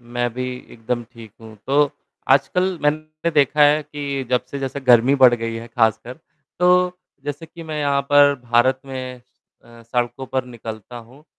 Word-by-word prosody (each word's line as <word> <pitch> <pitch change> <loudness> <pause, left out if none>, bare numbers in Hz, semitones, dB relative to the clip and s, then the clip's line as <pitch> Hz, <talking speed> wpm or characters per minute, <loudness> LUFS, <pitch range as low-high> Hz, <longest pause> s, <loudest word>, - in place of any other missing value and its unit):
मैं 120 0 -2
भी 125 0 -3 0.3
एकदम 120 +1 -3
ठीक 115 -3 -13
हूँ, 110 -1 -12
तो 145 +1 +3 0.4
आजकल 175 +7 +2
मैंने 155 +2 -1
देखा 150 0 +3
है 150 +1 +5
कि 140 -2 -5
जब 125 - +1
से 140 - -5
जैसे 135 +1 -4
गर्मी 125 +1 +5
बढ़ 130 -3 +6
गई 115 -1 -4
है 115 +1 -7
ख़ासकर, 110 +2 0 0.4
तो 180 0 +3 0.3
जैसे 145 +3 -5
कि 165 +1 -12
मैं 155 -2 -5
यहाँ 140 -1 +1
पर 145 0 +6
भारत 120 +2 +2
में 130 -1 -6 0.4
अ, 115 0 -16
सड़कों 120 +3 -3
पर 130 0 -2
निकलता 115 -1 -9
हूँ। 120 +5 -14
130 Hz, 170 wpm, -21 LUFS, 120-145 Hz, 0.4 s, बढ़